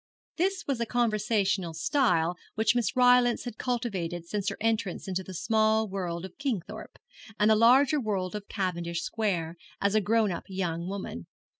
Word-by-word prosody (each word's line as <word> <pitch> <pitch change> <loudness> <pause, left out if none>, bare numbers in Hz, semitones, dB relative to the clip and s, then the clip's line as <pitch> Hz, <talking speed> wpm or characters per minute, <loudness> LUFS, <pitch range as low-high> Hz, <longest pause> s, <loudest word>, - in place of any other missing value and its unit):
This 380 +2 0
was 275 -4 -1
a 235 - -1
conversational 210 -7 0
style 175 - +2 0.2
which 220 +1 +3
Miss 240 +2 0
Rylance 245 -1 +4
had 245 -3 -7
cultivated 195 -9 -2
since 205 +3 -2
her - - -6
entrance 220 -4 -1
into 190 0 -2
the 185 0 -9
small 220 +2 +2
world 180 -3 -4
of 185 - -12
Kingthorpe, 220 - -4 0.4
and 210 +1 +5
the - - +6
larger 260 +7 +5
world 195 -5 -2
of 210 -1 -6
Cavendish 175 -3 -2
Square, 185 -5 -2 0.2
as 200 0 +1
a 215 - +3
grown 215 0 +2
up 170 - -5
young 175 -3 -3
woman. 185 - -6
210 Hz, 165 wpm, -28 LUFS, 180-230 Hz, 0.4 s, the